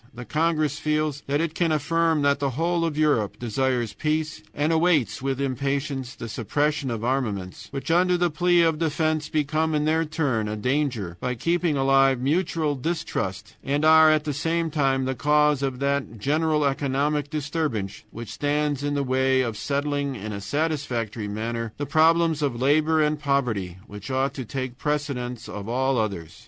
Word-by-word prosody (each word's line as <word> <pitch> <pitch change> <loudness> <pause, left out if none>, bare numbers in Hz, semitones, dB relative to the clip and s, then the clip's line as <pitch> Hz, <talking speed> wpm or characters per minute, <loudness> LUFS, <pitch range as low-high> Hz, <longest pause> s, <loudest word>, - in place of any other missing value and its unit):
The 125 +1 -7
congress 155 -2 0
feels 150 -2 -1
that 145 +2 +1
it 165 -1 -2
can 165 -1 +1
affirm 160 0 +1
that 140 0 +3
the 140 -1 0
whole 165 +6 0
of 155 -3 -2
Europe 145 -10 +1
desires 120 -1 -1
peace, 155 +6 -2
and 150 +3 0
awaits 160 - +2
with 135 0 -2
impatience 135 -1 -2
the 115 - -7
suppression 145 +6 -1
of 115 -2 -3
armaments, 110 -8 -2
which, 135 +3 -4
under 180 +1 +3
the 175 -1 +1
plea 175 +2 +3
of 160 -2 +1
defense, 155 -1 0
become 155 +1 0
in 150 0 +1
their 160 +1 +2
turn 145 -9 -1
a 105 - -3
danger 120 - -1
by 125 +5 -2
keeping 170 +3 0
alive 135 -1 +4
mutual 155 +2 0
distrust, 125 - -3
and 145 +2 0
are, 160 0 +7
at 155 -1 +3
the 150 - -2
same 165 +3 -1
time, 135 -3 +1
the 130 - -1
cause 150 +2 +2
of 135 -2 -1
that 140 -3 -1
general 150 +5 +1
economic 140 +1 0
disturbance 150 -9 -3
which 115 -1 -8
stands 145 -1 0
in 145 0 -1
the 140 - 0
way 130 0 +2
of 115 -4 -2
settling 140 +3 -1
in 105 -1 -6
a 100 - -5
satisfactory 125 -5 -2
manner 115 +2 -4
the 145 - -3
problems 160 +2 +3
of 135 -5 -1
labor 155 +4 +3
and 150 0 0
poverty, 120 - -1
which 105 -1 -9
ought 130 +1 0
to 130 - -6
take 130 +1 -5
precedence 140 -5 -3
of 105 +1 -7
all 130 +2 +1
others. 95 -7 -4
140 Hz, 175 wpm, -24 LUFS, 125-155 Hz, -, are